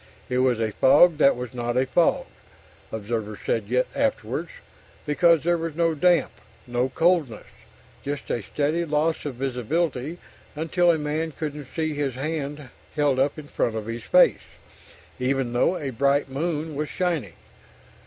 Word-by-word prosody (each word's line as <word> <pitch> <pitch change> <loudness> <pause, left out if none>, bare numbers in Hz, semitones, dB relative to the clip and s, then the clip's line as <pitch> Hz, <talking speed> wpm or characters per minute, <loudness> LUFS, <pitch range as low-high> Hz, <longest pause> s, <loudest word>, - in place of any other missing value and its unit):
It 125 0 0
was 130 -3 +2
a 110 -1 0
fog 155 - +5
that 140 - +5
was 125 0 -6
not 120 0 -2
a 130 - +3
fog, 165 +6 +2 0.7
observers 110 -1 -4
said 115 +3 +1
afterwards, - - -1 0.6
because 165 +1 +3
there 175 0 +2
was 165 -2 -4
no 165 0 +2
damp, 175 +3 +3 0.3
no 125 +1 -1
coldness 160 - +1 0.6
just 145 0 -4
a 120 - -1
steady 150 - -1
loss 155 0 0
of 140 -4 -4
visibility 135 +4 -2 0.4
until 170 +3 +1
a 165 - +4
man 155 +1 -2
couldn't 150 -2 -5
see 160 -1 -1
his 145 -3 -2
hand 145 -1 -4 0.3
held 145 -3 +2
up 140 +3 +1
in 150 -1 -9
front 115 -5 -1
of 110 -1 -4
his 115 +1 -5
face, - - +4 0.8
even 130 -1 0
though 150 +9 +2
a 140 -3 -4
bright 140 +3 +2
moon 155 +3 -3
was 150 +1 -3
shining. 175 -6 -2
145 Hz, 155 wpm, -24 LUFS, 125-160 Hz, 0.8 s, fog